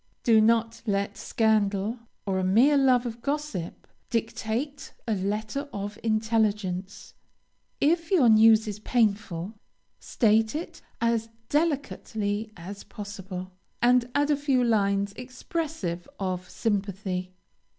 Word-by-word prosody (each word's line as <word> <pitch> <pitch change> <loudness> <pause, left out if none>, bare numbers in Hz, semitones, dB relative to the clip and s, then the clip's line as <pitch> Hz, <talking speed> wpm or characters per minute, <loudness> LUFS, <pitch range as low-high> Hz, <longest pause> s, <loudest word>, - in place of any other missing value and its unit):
Do 225 -2 +5
not 225 +1 +2
let 200 0 0
scandal 215 0 +1 0.3
or 190 -2 0
a - - -1
mere 230 +11 +5
love 260 -3 +4
of 235 0 -5
gossip 280 - -3 0.2
dictate 235 +5 -3
a 225 - +1
letter 215 +8 -2
of 205 +1 -5
intelligence. 215 -4 -1 0.7
If 330 +2 +2
your 330 -11 +5
news 220 0 +6
is 210 -1 -4
painful, 205 -5 0 0.5
state 220 +1 +2
it 325 +3 -6 0.2
as 230 -1 +1 0.2
delicately 225 -9 -1
as 195 +4 -8
possible, 190 -3 -7 0.3
and 245 0 +4
add 290 +1 +3
a - - +4
few 275 -3 +1
lines 200 -3 +1
expressive 255 - -4
of 185 -2 -3
sympathy. 195 -3 -2
220 Hz, 115 wpm, -27 LUFS, 200-250 Hz, 0.7 s, news